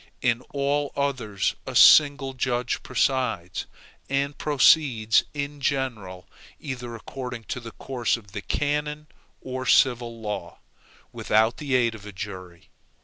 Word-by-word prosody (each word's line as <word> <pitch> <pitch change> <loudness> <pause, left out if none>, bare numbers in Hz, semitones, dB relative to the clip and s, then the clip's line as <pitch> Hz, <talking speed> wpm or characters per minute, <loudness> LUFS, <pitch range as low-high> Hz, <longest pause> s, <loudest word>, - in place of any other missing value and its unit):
In 120 -1 +2
all 140 +1 0
the - - -4
others 125 -8 -1
a - - -5
single 145 -3 +6
judge 125 -1 -1
presides, 120 -9 -1 0.4
and 140 +1 0
proceeds 135 -6 +4
in 145 0 -4
general 110 -10 -3 0.3
either 125 -5 -6
according 125 0 -7
to - - -3
the 115 -2 -9
course 125 -3 -1
of 100 -4 -16
the 105 0 -5
canon 150 +4 -2 0.4
or 130 0 -5
civil 120 -3 +3
law, 105 -6 -5 0.5
without 110 +2 +1
the 140 -3 -1
aid 120 -2 +2
of 105 -2 -11
a - - -7
jury. 90 -3 -9
125 Hz, 135 wpm, -25 LUFS, 110-140 Hz, 0.5 s, single